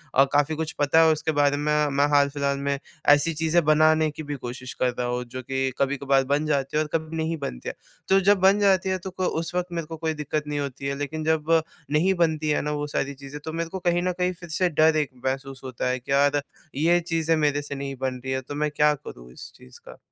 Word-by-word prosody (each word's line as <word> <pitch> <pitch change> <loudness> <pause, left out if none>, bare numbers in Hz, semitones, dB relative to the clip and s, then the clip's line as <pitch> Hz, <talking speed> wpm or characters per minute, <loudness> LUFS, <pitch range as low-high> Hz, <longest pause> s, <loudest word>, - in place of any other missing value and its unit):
अ, 135 - +7
काफ़ी 145 +2 +2
कुछ 160 0 -3
पता 145 +3 +4
है 160 - +5
उसके 155 +1 -1
बारे 145 0 +3
में। 145 - -3 0.3
मैं 145 +1 +4
हाल-फ़िलहाल 140 -1 +2
में 140 0 -1 0.3
ऐसी 145 +3 +5
चीज़ें 160 +2 +1
बनाने 155 0 +4
की 155 - -8
भी 145 0 -4
कोशिश 125 0 -7
कर 125 -1 0
रहा 120 - 0
हूँ 125 0 -2
जो 130 - -3
कि 135 +1 -1
कभी-कभार 140 0 +2
बन 150 +2 +1
जाती 140 -1 0
हैं 155 - +3
और 150 - -8
कभी 160 0 -2
नहीं 160 +1 -1
बनती 140 - -5
हैं। - - -7 0.3
तो 195 - +6
जब 200 0 +4
बन 195 +2 +5
जाती 190 -2 +3
है 185 - 0
तो - - -5
क 185 - +1
उस 165 +2 -3
वक़्त 180 0 0
मेरे 165 -2 -4
को 165 - -7
कोई 160 0 -1
दिक्कत 150 0 -3
नहीं 145 -1 -2
होती 140 -1 -5
है 140 - -1
लेकिन 155 +2 -4
जब 160 -1 +1 0.5
नहीं 170 +6 +3
बनती 160 -3 +1
हैं 150 - +2
ना, 150 - -2
वो 150 0 -2
सारी 140 -1 -2
चीज़ें 140 +1 -9
तो 160 - -5
मेरे 165 0 -3
को 190 +2 -5
कहीं 175 -1 +1
न 180 - +1
कहीं 180 0 +1
फिर 175 -1 -12
से 180 +3 +1
डर 155 0 +4
एक 150 -3 0 0.2
महसूस 135 0 -3
होता 130 -1 -3
है 130 0 -1
कि 130 - -9
यार 145 +1 +3 0.3
ये 170 +5 +3
चीज़ें 165 -1 0
मेरे 145 -1 +1
से 145 0 -6
नहीं 135 0 -5
बन 130 -1 -2
रही 130 - -4
है 130 - -1
तो 145 +3 -8
मैं 150 0 -1
क्या 150 0 +3
करूँ - - -12
इस - - -11
चीज़ 65 - -16
का? - - -12
150 Hz, 255 wpm, -25 LUFS, 140-160 Hz, 0.5 s, अ